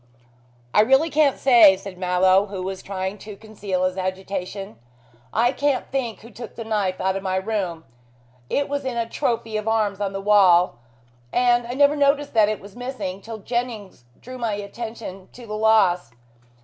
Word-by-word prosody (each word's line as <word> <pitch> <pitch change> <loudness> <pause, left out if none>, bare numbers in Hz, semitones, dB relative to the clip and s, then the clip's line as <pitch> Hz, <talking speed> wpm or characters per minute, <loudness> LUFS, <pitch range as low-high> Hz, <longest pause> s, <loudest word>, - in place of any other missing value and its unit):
"I - - +6
really 270 +8 +3
can't 295 -2 +3
say," 230 -7 +7
said 195 0 -9
Mallow, 185 +2 +3
who 195 -2 -5
was 190 0 -5
trying 190 +1 -4
to 210 0 -9
conceal 200 -3 -4
his 185 +1 -1
agitation. 185 - -5 0.5
"I 240 +2 +2
can't 280 -1 0
think 250 -5 -3
who 230 - -13
took 235 +1 -10
the 230 - -6
knife 205 -4 -1
out 190 0 0
of 195 - -3
my 190 -1 -2
room. 190 -5 -2 0.6
It 285 - 0
was 285 0 -3
in 255 -2 -3
a 230 -1 -1
trophy 225 -2 -2
of 215 +1 -5
arms 210 -3 0
on 200 -1 -1
the 195 - -4
wall, 185 - +4 0.5
and 240 - +2
I 245 - -4
never 285 +1 +4
noticed 285 0 +1
that 215 -2 +4
it 215 - -2
was 200 0 -13
missing, 220 -7 -5
till 225 +2 -7
Jennings 220 - -4
drew 255 +1 -10
my 230 -3 -1
attention 205 -2 -7
to 245 - -12
the 215 - -7
loss. 215 - +3
210 Hz, 180 wpm, -23 LUFS, 190-240 Hz, 0.6 s, say